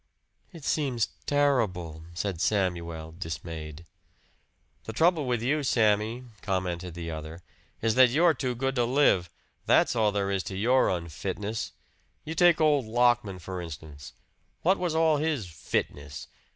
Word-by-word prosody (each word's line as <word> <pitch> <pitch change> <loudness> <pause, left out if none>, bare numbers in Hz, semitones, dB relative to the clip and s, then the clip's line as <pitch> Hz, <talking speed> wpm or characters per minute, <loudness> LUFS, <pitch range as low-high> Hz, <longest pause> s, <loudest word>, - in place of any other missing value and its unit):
"It 165 -5 -12
seems 130 -7 0 0.2
terrible," 100 - +1
said 90 -2 -3
Samuel 85 -5 -1
dismayed. 80 -1 -7 1.0
"The 110 - -5
trouble 160 +1 +3
with 120 -2 0
you, 150 +5 +1
Sammy," 110 -1 +2 0.2
commented 90 -3 -2
the 85 -1 -5
other, 80 +2 -7 0.4
"is 115 -1 +3
that 130 +1 +6
you're 160 +6 +4
too 130 -4 -2
good 135 +2 -1
to 120 - +3
live. 115 - +3 0.4
That's - - +4
all 110 -2 +3
there 100 -1 -1
is 95 -1 0
to 95 - -5
your 125 +6 +3
unfitness. 95 +5 -3 0.5
You 160 - -4
take 175 +1 +5
old 150 -5 +3
Lockman, 120 -4 +2
for 90 +1 -6
instance. 75 -3 -9 0.5
What 190 +4 +3
was 175 -3 -1
all 160 -2 +4
his 150 -7 -1
'fitness'? 75 -3 -4
105 Hz, 140 wpm, -28 LUFS, 85-135 Hz, 1.0 s, that